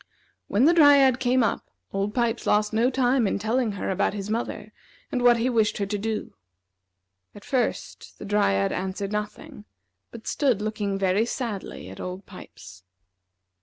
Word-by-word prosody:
When 220 +7 +2
the 335 - +6
Dryad 280 -5 +6
came 255 -1 +2
up, 220 - -2 0.2
Old 200 +1 -2
Pipes 235 -1 0
lost 210 +1 +2
no 230 +3 +3
time 255 -2 +2
in - - 0
telling 220 +2 0
her 195 - -3
about 190 +2 0
his 205 +1 -5
mother, 215 -2 -4 0.4
and 250 - -1
what 245 -1 +5
he 230 +2 0
wished 225 -4 +1
her 200 - -1
to 205 +1 -3
do. 220 +1 -3 1.0
At 205 - -13
first, 255 -3 -3
the - - -9
Dryad 100 - +1
answered 190 +2 -3
nothing, 210 0 -6 0.4
but 230 -1 -12
stood 260 -8 +1
looking 210 -2 -2
very 195 +3 +1
sadly 225 - -5
at 95 - -11
Old 185 +2 -6
Pipes. 95 - -13
215 Hz, 165 wpm, -25 LUFS, 200-245 Hz, 1.0 s, the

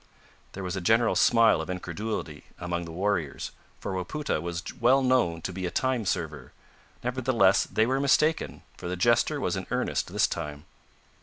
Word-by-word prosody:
There 95 - -6
was 90 0 -3
a 95 - -3
general 115 +5 +3
smile 115 -7 +5
of 80 - -7
incredulity 90 -3 -4
among 85 0 -3
the 85 - -8
warriors, 90 -4 -2 0.3
for 95 - -4
Wapoota 95 - -2
was 85 0 -4 0.2
well 130 +3 +4
known 120 -11 +2
to 90 - -3
be 95 0 -3
a - - -2
time 125 0 0
server: 75 -8 -3 0.5
nevertheless 125 -6 +3
they 110 - +1
were 130 +3 +1
mistaken, 150 +3 +2
for - - -6
the 90 +1 -3
jester 120 +6 +3
was - - -1
in - - -5
earnest - - -1
this - - +3
time. 75 0 -5
95 Hz, 170 wpm, -27 LUFS, 85-120 Hz, 0.5 s, smile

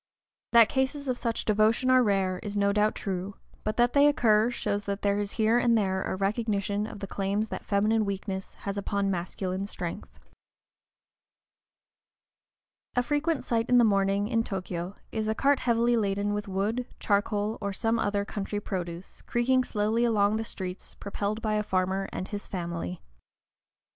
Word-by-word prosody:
That 230 -2 +8
cases 275 +2 -1
of 255 - +1
such 230 -2 -2
devotion 220 +4 +3
are 255 0 +6
rare 195 -4 +1
is 205 -1 -4
no 200 0 +3
doubt 210 +1 +2
true, 195 0 -4 0.3
but 215 - -2
that 240 0 +3
they 285 0 +6
occur 225 -5 +4
shows 205 -4 -2
that 200 0 -3
there 200 0 +2
is 205 0 -3
here 225 +2 +3
and 235 -1 +3
there 190 -3 0
a - - -2
recognition 205 0 -1
of 205 - -9
the - - -2
claims 200 +2 -1
that - - -5
feminine 215 +2 +2
weakness 195 -1 -4
has 200 0 -4
upon 200 0 0
masculine 185 +2 -3
strength. - - -7 2.7
A 245 - +3
frequent 295 +3 0
sight 230 -1 0
in 250 - +6
the 240 - +7
morning, 200 -1 +2
in 230 -1 +1
Tōkyō, 185 -2 -4 0.2
is 220 -1 -2
a 220 - 0
cart 280 +3 +3
heavily 235 0 +2
laden 205 -1 0
with 205 0 -3
wood, 210 +6 -1
charcoal, 205 +1 0
or 200 - -2
some 225 +4 0
other 205 -1 0
country 205 0 -3
produce, 180 -3 -6
creaking 255 +2 +2
slowly 220 0 0
along 215 -2 +3
the 225 - -2
streets, 185 -4 -6
propelled 205 +2 -3
by 215 -1 0
a 210 - +2
farmer 190 -1 -1
and 185 - -5
his 205 -2 -5
family. 175 -1 -4
205 Hz, 170 wpm, -28 LUFS, 195-230 Hz, 2.7 s, That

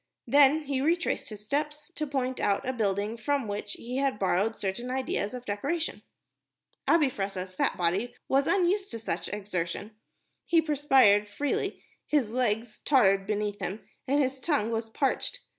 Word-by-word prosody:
Then 290 +2 +5
he 275 -2 -1
retraced 335 +4 0
his 210 -1 -10
steps 300 +5 -2
to 305 -2 -3
point 260 -2 -2
out 200 +4 +1
a 260 - 0
building 210 -1 -1
from 270 +2 0
which 205 0 -4
he 245 +2 -5
had 275 -4 +1
borrowed 200 +3 +1
certain 200 +6 -3
ideas 255 -4 -2
of 250 0 -8
decoration. 285 +11 -2 0.9
Abi 330 -3 +5
Fressah's 195 -3 -4
fat - - 0
body 195 +8 0
was 275 +1 +2
unused 390 +1 +2
to - - -5
such 175 -6 -3
exertion. 200 0 -3 0.6
He 335 - +5
perspired 270 -9 +4
freely, 285 +7 -2 0.2
his 275 -8 +1
legs 225 -2 -1
tottered 195 -8 +4
beneath 210 -1 -1
him, 195 +3 -5 0.2
and 280 +2 +3
his 265 0 -2
tongue 260 -7 0
was 225 0 -2
parched. 280 - -1
240 Hz, 160 wpm, -28 LUFS, 205-285 Hz, 0.9 s, Then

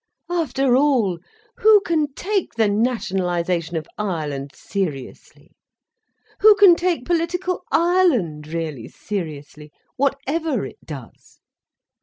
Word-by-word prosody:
After 275 -7 +1
all, 250 -11 +2 0.4
who 430 -1 +6
can 315 -6 0
take 390 - -2
the 225 -2 +3
nationalisation 180 -6 -1
of 155 - -4
Ireland 150 -9 -3
seriously? 155 -10 -6 0.9
Who 430 0 +7
can 400 -4 +7
take 345 -6 -1
political 350 +2 -1
Ireland 290 - +2
really 155 -7 -5
seriously, 150 -5 -7 0.3
whatever 275 0 -1
it - - -12
does? 135 -7 -11
230 Hz, 100 wpm, -21 LUFS, -, 0.9 s, Who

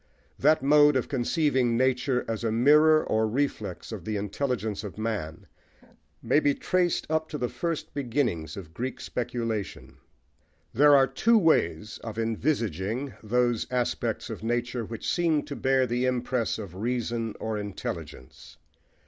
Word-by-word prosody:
That 150 -1 +4
mode 145 +1 +6
of 130 - 0
conceiving 130 -2 +1
nature 130 0 +1
as 115 0 -3
a 115 - 0
mirror 150 +7 +5
or 110 0 +1
reflex 110 -7 -3
of 105 -6 -6
the 110 +2 -2
intelligence 105 0 -2
of 105 -1 -8
man 110 -8 -4 0.8
may - - +3
be 145 -2 +2
traced 180 -2 0
up 160 0 -1
to 150 - -4
the 125 - -1
first 165 -2 -4
beginnings 120 - -2
of 85 -5 -9
Greek 125 +7 -4
speculation. 115 -4 -4 0.8
There 145 +3 +6
are 135 -1 +6
two 225 +13 +3
ways 105 - +1
of 110 -1 -6
envisaging 115 - -1
those 120 +1 +1
aspects 125 -1 -2
of - - -6
nature 120 +1 -1
which 115 +1 -6
seem 165 -4 +1
to 145 -1 -7
bear 130 -1 +2
the 125 +1 0
impress 125 -1 -1
of 100 -6 -8
reason 115 +1 -2
or 110 -1 -3
intelligence. 100 -10 -7
120 Hz, 145 wpm, -27 LUFS, 110-140 Hz, 0.8 s, mode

